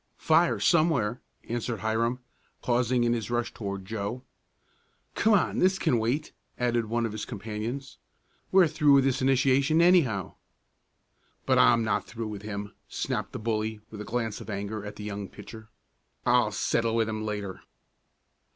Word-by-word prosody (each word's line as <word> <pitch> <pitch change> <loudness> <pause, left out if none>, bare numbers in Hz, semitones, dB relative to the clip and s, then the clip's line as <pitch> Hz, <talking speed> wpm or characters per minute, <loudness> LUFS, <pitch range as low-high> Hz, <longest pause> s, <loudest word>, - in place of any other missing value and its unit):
"Fire, 165 +2 +3
somewhere," 155 -9 +2 0.3
answered 120 -1 -3
Hiram, 115 +3 0 0.4
pausing 125 0 +2
in 120 0 +2
his 115 -2 -3
rush 120 0 -1
toward 100 -3 -5
Joe. 110 +4 -4 0.9
"Come 220 +1 +3
on, 190 - +1
this 190 +1 +3
can 145 -11 +2
wait," 130 +8 -1 0.3
added 120 -2 0
one 115 +1 0
of 115 - -3
his 110 0 -5
companions. 115 +5 -5 0.5
"We're 190 -1 +7
through 150 -2 +3
with 135 -1 +6
this 135 -1 +1
initiation, 135 +3 +3
anyhow." 160 - +3 1.1
"But - - +3
I'm 115 -1 +5
not 110 - -1
through 115 -2 -5
with 105 -2 -6
him," 105 -1 -6
snapped - - -3
the - - -5
bully 110 -1 -2
with 105 -1 -7
a - - -4
glance 115 -1 -3
of - - -10
anger 105 +1 -4
at 105 0 -7
the 105 - -8
young 100 -2 -5
pitcher. 110 -1 -11 0.6
"I'll - - +3
settle 115 -1 0
with 115 -1 +2
him 110 0 -3
later." 105 -3 -4
115 Hz, 160 wpm, -27 LUFS, 105-130 Hz, 1.1 s, We're